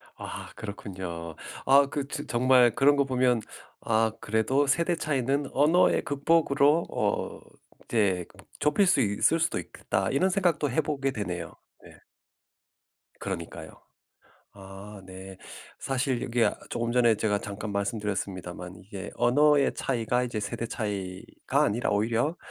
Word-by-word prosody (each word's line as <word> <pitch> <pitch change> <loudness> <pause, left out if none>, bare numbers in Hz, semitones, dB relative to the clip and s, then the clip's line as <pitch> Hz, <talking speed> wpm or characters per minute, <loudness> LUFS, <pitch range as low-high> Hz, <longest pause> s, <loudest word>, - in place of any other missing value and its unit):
아 - - -8
그렇군요. 90 -6 -7 0.3
아 140 +1 +6
그 140 0 -3
즈 145 +1 -5
정말 125 0 +4
그런 145 +1 +5
거 140 - +3
보면 125 -3 +2 0.4
아 110 0 +2
'그래도 110 +7 +1
세대 170 +5 +2
차이는 140 -2 -1
언어의 155 +6 +4
극복으로 145 +2 +2
어 - - -1 0.5
이제 95 -6 +1
그 - - -21 0.2
좁힐 150 +7 +3
수 - - +4
있을 105 +10 +2
수도 165 +1 0
있겠다.' - - -2
이런 185 +8 +2
생각도 175 -6 +1
해보게 140 -1 0
되네요. 90 -8 -5 0.3
네. - - -15 1.2
그러니까요. - - -6 0.8
아 100 +1 -11
네. 95 0 -10 0.4
사실 130 -2 -1
이게 120 -1 +1
아 - - -1
조금 120 0 -2
전에 120 -2 +4
제가 105 -1 0
잠깐 105 +1 -6
말씀드렸습니다만 95 -4 -4
이게 100 -1 -7
'언어의 145 +4 +3
차이가 125 -1 0
이제 120 -3 -3
세대 115 +3 -4
차이가 105 +6 -3
아니라 120 -4 0
오히려 115 +10 +1
120 Hz, 285 characters per minute, -27 LUFS, 100-140 Hz, 1.2 s, 아